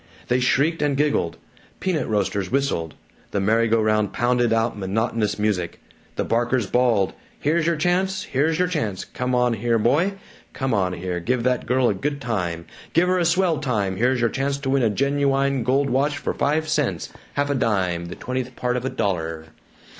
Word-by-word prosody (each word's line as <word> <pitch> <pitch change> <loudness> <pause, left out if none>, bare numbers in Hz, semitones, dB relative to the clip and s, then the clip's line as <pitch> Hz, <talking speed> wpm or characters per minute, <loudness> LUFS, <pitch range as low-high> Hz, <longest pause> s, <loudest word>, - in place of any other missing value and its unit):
They 125 - +3
shrieked 145 +6 +2
and 145 -2 +1
giggled; 145 - +1 0.4
peanut 175 -7 -1
roasters 100 -3 0
whistled; 130 - -1 0.3
the 100 - -1
merry 110 +4 +2
go 115 0 +3
round 110 -1 +2
pounded 120 0 +2
out 115 +1 +1
monotonous 105 +2 -1
music; 105 -5 -1 0.4
the - - 0
barkers 120 0 +1
bawled, 115 -3 +2 0.3
"Here's 160 +2 +1
your 170 - +2
chance 185 +4 0
here's 155 +4 0
your 180 +1 +2
chance 115 - -2
come 125 0 -2
on 125 -1 +3
here, 115 +1 +1
boy 150 - +2 0.4
come 135 -2 -1
on 95 -4 +1
here 90 0 -3
give 120 +7 -1
that 125 0 0
girl 125 0 +3
a - - +2
good 140 +9 -3
time 90 -9 -2 0.3
give 170 +2 +4
her 185 0 +2
a 175 - +1
swell 175 -1 +2
time 105 -9 -1
here's 125 +2 +2
your 115 - +2
chance 140 +1 -1
to 135 -1 -1
win 135 0 +3
a 115 - +3
genuwine 140 +2 +1
gold 135 +4 +1
watch 145 +3 +1
for 145 - -2
five 155 +2 0
cents, 145 - -1 0.2
half 145 0 +1
a - - +2
dime, 95 -9 0
the 90 - -7
twentieth 125 -1 -4
part 125 0 -1
of 125 - -3
a - - 0
dollah!" 80 -7 -2
125 Hz, 190 wpm, -23 LUFS, 105-140 Hz, 0.4 s, give